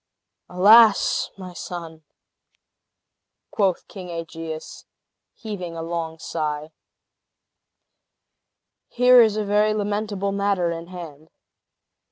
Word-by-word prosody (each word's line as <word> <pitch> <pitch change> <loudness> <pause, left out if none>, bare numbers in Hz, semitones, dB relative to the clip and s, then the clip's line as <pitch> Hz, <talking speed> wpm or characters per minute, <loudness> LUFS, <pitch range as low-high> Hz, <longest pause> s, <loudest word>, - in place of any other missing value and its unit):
"Alas! 210 +4 +5
my 185 -2 -9
son," 165 -3 -8 1.5
quoth 195 -4 0
King 185 -3 -10
Aegeus, 165 -1 -7 0.5
heaving 190 -7 -7
a 165 - -5
long 165 -1 -4
sigh, 155 -1 -4 2.2
"here 250 0 +6
is 215 -2 +3
a 215 - -1
very 210 +1 +2
lamentable 205 -1 -2
matter 200 -3 0
in 165 0 -6
hand! 160 -4 -10
180 Hz, 90 wpm, -23 LUFS, 165-205 Hz, 2.2 s, here